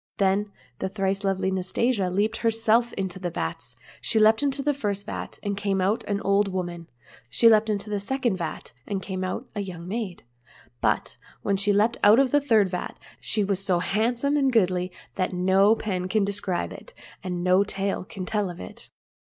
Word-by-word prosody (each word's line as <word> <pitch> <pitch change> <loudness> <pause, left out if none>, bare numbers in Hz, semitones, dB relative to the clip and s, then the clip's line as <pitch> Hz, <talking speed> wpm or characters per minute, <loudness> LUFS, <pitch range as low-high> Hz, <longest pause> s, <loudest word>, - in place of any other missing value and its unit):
Then 200 +1 +1 0.3
the 190 - -2
thrice 195 0 -1
lovely 190 -1 0
Nastasia 190 +2 0 0.3
herself 225 +1 +2
leaped - - -8
into 190 -1 -3
the 180 -1 -2
vats. 80 - -5 0.3
She 225 - +1
leaped 220 +2 +5
into 275 -1 0
the 295 +1 +2
first 205 -7 -3
vat, - - -6
and 200 -1 -1
came 200 -1 -1
out 195 +4 +1
an 200 -1 -1
old 200 +1 +2
woman; 175 -3 -4 0.4
she 230 - +4
leaped 220 -1 +5
into 205 0 -1
the 205 -1 -1
second 240 -1 -1
vat, 165 -7 -6
and 195 -2 -3
came 190 -1 -4
out 205 +7 -3
a 210 - -4
young 180 -4 -6
maid; 200 -3 -4 0.6
but - - 0 0.3
when 200 - +1
she 200 +1 +2
leaped 215 +4 +2
out 210 +2 +8
of 270 -2 +3
the 290 - +4
third 225 -8 +4
vat, 180 0 -4 0.2
she 215 - +1
was 195 -1 0
so 185 -3 +2
hand 215 +7 0
some 280 +4 +1
and 270 -2 +3
goodly 185 -5 +2 0.3
that 185 0 0
no 190 +4 +4
pen 185 -5 -3
can 205 +1 +1
describe 195 - -2
it, - - -13 0.3
and 180 -1 -3
no 185 +2 +4
tale 195 -1 -2
can 185 -1 -7
tell 210 -1 -1
of 175 - -8
it. 90 - -10
200 Hz, 195 wpm, -25 LUFS, 185-220 Hz, 0.6 s, out